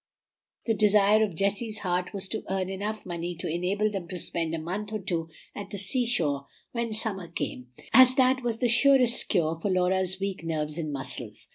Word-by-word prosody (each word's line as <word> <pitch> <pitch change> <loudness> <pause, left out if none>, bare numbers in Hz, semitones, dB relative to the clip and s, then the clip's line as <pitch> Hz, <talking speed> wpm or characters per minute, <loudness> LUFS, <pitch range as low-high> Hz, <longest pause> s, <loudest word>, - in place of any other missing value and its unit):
The 225 - +2
desire 210 +1 +4
of 200 -6 -2
Jessie's 205 +4 -1
heart 180 -2 -2
was 195 -2 0
to 220 - -4
earn 190 -1 -1
eneugh 210 +3 -4
money 175 0 -4
to 170 - -5
enable 185 +6 0
them 190 -4 -5
to 180 - -5
spend 165 -1 -1
a - - -3
month 190 +7 -4
or 215 - -1
two 170 -5 -3 0.2
at 200 -1 -7
the 205 - -6
seashore 185 - 0 0.2
when 235 -1 -2
summer 210 -4 -3
came, 125 -6 -5 0.3
as 255 0 +8
that 260 0 +3
was 235 -2 -1
the 245 - +1
surest 250 0 +5
cure 160 -2 +2
for 200 - -2
Laura's 185 0 +1
weak 195 -3 -3
nerves 155 -1 -2
and 155 -2 -3
muscles. 135 -2 -7
195 Hz, 190 wpm, -27 LUFS, 170-215 Hz, 0.3 s, as